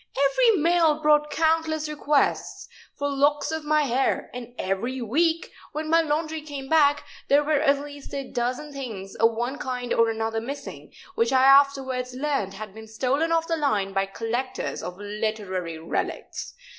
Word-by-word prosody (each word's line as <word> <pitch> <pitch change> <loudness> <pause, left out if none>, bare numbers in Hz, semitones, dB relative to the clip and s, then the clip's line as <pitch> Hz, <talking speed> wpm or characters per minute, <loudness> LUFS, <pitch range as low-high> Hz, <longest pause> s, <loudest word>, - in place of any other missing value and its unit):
Every 455 - +4
mail 325 -1 +3
brought 300 -1 +3
countless 315 0 +1
requests 295 -1 0 0.3
for 285 - -1
locks 285 +2 +1
of 320 -1 -3
my 305 0 +2
hair; 265 0 0
and 245 -1 -8
every 225 +8 -2
week, 320 +8 0 0.2
when 310 +1 -3
my 330 0 +6
laundry 315 0 -1
came 285 -3 -7
back, 290 -1 +4 0.2
there 285 +1 +4
were 300 -1 +2
at 280 0 +4
least 285 -1 -10
a 275 -1 -4
dozen 255 +5 -2
things 220 -8 -6
of 230 +1 +3
one 240 +5 -3
kind 250 -1 -3
or 230 0 +3
another 225 0 -2
missing, 275 +5 -7 0.2
which 230 -4 +1
I 260 -1 +4
afterwards 270 -2 +4
learned 265 -9 -1
had 210 -1 -8
been 220 +1 -11
stolen 265 +9 0
off 330 0 +2
the 330 - +1
line 210 -10 0
by 195 0 +1
collectors 230 +6 -3
of 180 0 -6
literary 205 -5 -3
relics. 160 +1 -4
275 Hz, 165 wpm, -25 LUFS, 225-300 Hz, 0.3 s, my